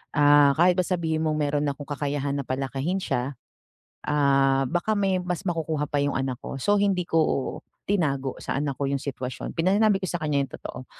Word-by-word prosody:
ah, 145 -1 +6
kahit 175 +2 +4
pa - - +4
sabihin 165 -3 0
mong 155 -1 +1
meron 145 0 0
akong 140 +1 -3
kakayahan 145 -1 -2
na 140 - -2
palakihin 135 +7 -2
siya, 130 +3 -2 0.7
ah, 135 -2 +3
baka 175 +5 0
may 195 -2 +1
mas 180 +1 -3
makukuha 160 -4 -1
pa 145 - 0
yung 145 0 0
anak 130 -2 -2
ko. - - -6
So, 205 +10 +2
hindi 195 -3 +2
ko, 160 -5 0 0.3
tinago 140 -9 0
sa - - -4
anak 140 -2 -2
ko 140 - -1
yung 140 -1 -1
sitwasyon, 130 -2 -5
pina 180 +4 +3
sinabi 210 -1 +4
ko 195 - -4
sa 175 - -3
kanya 150 -2 +1
yung - - -22
totoo. 130 - -8
145 Hz, 195 wpm, -25 LUFS, 140-175 Hz, 0.7 s, ah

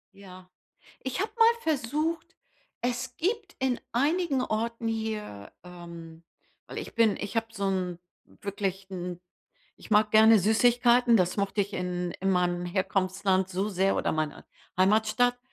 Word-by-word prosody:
Ja, 185 -2 -13 0.5
ich 260 -1 -4
habe 425 - -2
mal 460 0 +6
versucht 310 +3 -1 0.5
es 245 +1 -3
gibt 395 0 -2
in 260 -2 +1
einigen 290 +2 +1
Orten 230 0 -2
hier, 220 - -4
ähm 170 -2 -11 0.4
weil - - -8
ich - - -7
bin 230 -3 +3
ich 205 +2 -6
habe 225 0 0
so 200 -3 -3
'n 180 -2 -2 0.3
wirklich 195 -1 -5
'n, 180 -1 -5 0.6
ich - - -15
mag 210 0 +4
gerne 220 +1 +7
Süßigkeiten, 240 +3 +4
das 180 -3 +1
mochte 200 0 0
ich 200 +1 -2
in 180 -1 -3
in 195 +1 +1
meinem 175 -1 +1
Herkunftsland 190 0 0
so 190 +2 -2
sehr 195 -1 +1
oder - - 0
meiner 155 -2 -3 0.3
Heimatstadt. 220 +5 +3
210 Hz, 145 wpm, -28 LUFS, 185-245 Hz, 0.6 s, gerne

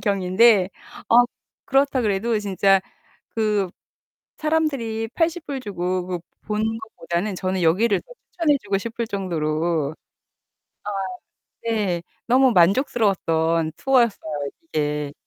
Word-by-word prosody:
경위인데 195 0 +4 0.4
아 230 - +5 0.5
그렇다 270 -1 +2
그래도 215 +2 +1
진짜 195 -1 +3 0.5
그 210 -4 0 0.7
사람들이 275 -8 0
$80 325 -5 -1
주고 185 -4 -2
그 180 -1 -3 0.3
보는 210 0 0
것보다는 195 -3 -3
저는 185 0 -2
여기를 200 +7 +3
더 - - -16 0.2
추천해 315 -5 +2
주고 200 -1 0
싶을 230 +2 -4
정도로 165 -5 -1
아 - - -13 1.7
네. 205 -7 0 0.2
너무 255 +2 +5
만족스러웠던 170 - +2
투어였어요, 245 - +2 0.4
이게. 150 -1 -1
205 Hz, 235 characters per minute, -23 LUFS, 175-235 Hz, 1.7 s, 아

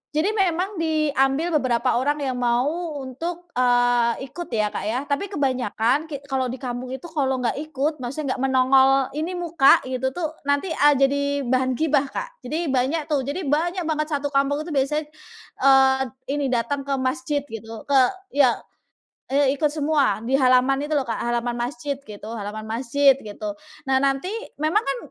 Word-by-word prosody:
jadi 325 +7 +2
memang 380 -2 0
diambil 305 -1 +1
beberapa 250 -1 +1
orang 290 +3 0
yang 260 -2 -2
mau 290 +8 0
untuk, 340 +7 -6
eee, 245 -2 +2
ikut 345 -1 -6
ya 215 -3 0
Kak - - -4
ya, 245 +5 -1
tapi 290 +7 -2
kebanyakan 260 - 0
ki 285 -3 -7
kalau 260 -1 0
di 250 - -4
kampung 250 -1 -5
itu 265 - -11
kalau 270 -4 0
nggak 250 +1 -1
ikut, 305 0 -2
maksudnya 260 +2 -3
nggak - - -2
menongol 265 0 +5 0.2
ini 315 +6 -3
muka 340 -5 +4
gitu 260 0 -2
tuh, 320 -3 -4
nanti, 285 +5 +1
eee, 295 -2 +5
jadi 275 +1 +2 0.3
bahan 255 0 +2
gibah, 290 -1 +1
Kak. - - -6
Jadi 315 +2 -2
banyak 270 +5 +1
tuh 275 -3 0
jadi 310 +7 -3
banyak 340 +5 0
banget 305 -1 -1
satu 290 -2 -2
kampung 280 +1 +1
itu 330 - -8
biasanya, 295 +2 0 0.6
eee, 265 0 +5 0.3
ini 285 -1 0
datang 260 +3 -1
ke 275 - +1
masjid 285 +3 -1
gitu, 225 -3 -9
ke 280 -1 +3 0.3
ya, 270 -4 +4 0.8
eee, 280 -1 +4
ikut 295 +1 +1
semua 295 -5 +1
di 255 +4 +1
halaman 260 +1 +3
itu 305 - -3
loh 285 -2 +2
Kak, 230 - -1
halaman 240 0 -1
masjid 280 +4 -3
gitu 215 -6 -10
halaman 215 +1 -6
masjid 265 +4 +3
gitu. 220 +7 -7 0.4
Nah 265 - +4
nanti 275 +6 0 0.3
memang 325 +8 +2
kan, - - -2
275 Hz, 170 wpm, -23 LUFS, 255-310 Hz, 0.8 s, menongol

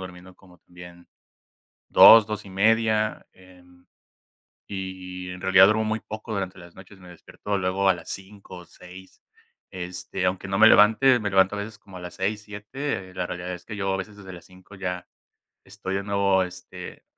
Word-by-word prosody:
durmiendo 90 0 -11
como 90 -2 -20
también 90 0 -15 0.8
2, 115 -2 +9
2:30, 110 +1 0
em, 90 -1 -21 0.9
y 90 -1 -7
en 90 0 -9
realidad 95 0 +6
duermo 110 +2 +2
muy 110 0 -2
poco 110 +1 -9
durante 95 -2 -4
las 85 0 -15
noches, 95 +1 -15
me 90 -1 -14
despierto 100 +3 -6
luego 95 +1 0
a - - +4
las - - -12
5 95 -1 -9
o 90 - -12
6. 95 +3 -15 0.5
Este, 90 0 -5
aunque 95 +1 -3
no 95 +1 -2
me 110 - +8
levante, 110 +4 +5
me 100 -2 -3
levanto 95 +1 +3
a - - -4
veces 105 0 -7
como 95 -2 -13
a - - -9
las 90 0 -9
6, 105 +2 -3
7. 105 0 -6
La 90 - -2
realidad 90 +1 -6
es 90 - -10
que 110 - -7
yo 95 -1 -2
a - - -3
veces 100 +2 -7
desde 95 -2 -11
las 85 -1 -12
5 95 +2 -17
ya 90 -1 -5 0.6
estoy 95 +1 -6
de 100 - -2
nuevo, 100 -1 +1
este, 90 0 -10
95 Hz, 180 wpm, -24 LUFS, 90-105 Hz, 0.9 s, 2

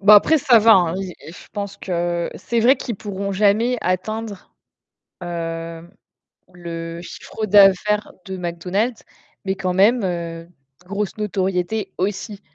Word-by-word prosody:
Bah 210 +1 +8
après, 310 +10 +6
ça 245 -3 +5
va 225 +1 +6
hein. 175 -3 +4
I 190 -2 -5
je 180 - -12
pense 200 -1 -5
que 175 -1 -2
c'est 235 -1 -1
vrai 255 +5 +5
qu'ils 240 -3 -5
pourront 200 0 -4
jamais 215 +5 +3
atteindre, 205 +2 -3 0.7
hem, 165 0 -5 0.6
le 170 -1 -6
chiffre 215 +4 -6
d'affaires 205 +1 +4
de 190 -1 -5
McDonald's 180 +7 -2 0.4
mais 190 0 0
quand 185 -1 -2
même, 210 +5 +4
heu, 170 -2 -4 0.4
grosse 200 +2 -3
notoriété 195 0 -1
aussi. 200 +2 -3
195 Hz, 135 wpm, -21 LUFS, 175-210 Hz, 0.7 s, Bah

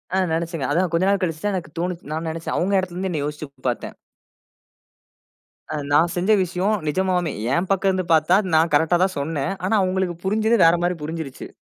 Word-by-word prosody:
ஆ - - +2 0.2
நினச்சேங்க. 165 -3 -2
அதான் 175 +3 +1
கொஞ்ச 170 +3 +2
நாள் 200 -1 +1
கழிச்சு 160 -3 -3
தான் 205 - +1
எனக்கு 160 -4 -6
தோணுச்சு. 175 0 -3
நான் 160 +1 -3
நினச்சேன். 165 +1 -4
அவுங்க 195 +2 +2
இடத்தில 185 -2 -4
இருந்து 190 +1 -2
என்னைய 150 -4 -2
யோசிச்சு 150 +1 -5 0.2
பார்த்தேன். 120 - -5 1.7
அ - - -3 0.2
நான் 160 +4 +4
செஞ்ச 180 +4 +1
விஷயம் 185 +4 0
நிஜமாவுமே 180 0 0 0.2
என் 180 +5 0
பக்கம் 195 0 +2
இருந்து 185 -1 0
பார்த்தா, 160 +4 +4 0.2
நான் 160 +1 +3
கரெக்ட்டா 160 +4 +3
தான் 190 -1 0
சொன்னேன். 145 +3 -2
ஆனா 200 - +2
அவுங்களுக்கு 185 -1 -1
புரிஞ்சது 220 +4 +2
வேற 165 +1 +6
மாரி 180 0 +1
புரிஞ்சிருச்சு. 160 -3 -6
175 Hz, 185 wpm, -22 LUFS, 160-185 Hz, 1.7 s, வேற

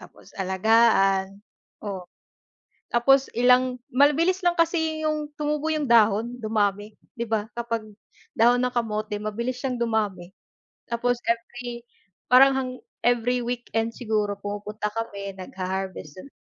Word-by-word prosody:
tapos - - -16
alagaan 195 0 +3 0.5
o 195 -3 -4 0.9
tapos 270 +3 +4
ilang, 250 +1 +3
mabilis 315 +8 +3
lang 350 - +4
kasi 320 -2 0
'yung 305 -1 -1
tumubo 300 0 -2
yung 295 -5 -2
dahon 225 0 +4
dumami, 210 -2 -1 0.2
di 235 - -2
ba 220 -1 -2
kapag 230 -2 -2 0.5
dahon 240 +2 +5
ng 250 - +1
kamote 215 -2 -2
mabilis 235 +4 -3
siyang 250 -2 -3
dumami. 210 -6 -1 0.6
Tapos 245 +1 +1
every 235 +1 -4 0.4
parang 265 +2 +7
hang 255 -1 -2 0.3
every 245 +1 +2
weekend 235 -2 -3
siguro 215 -4 -1
pumupunta 205 +1 -5
kami 200 -3 -5
nagha-harvest 185 -3 -5
dun. 280 - -11
230 Hz, 120 wpm, -25 LUFS, 210-250 Hz, 0.9 s, parang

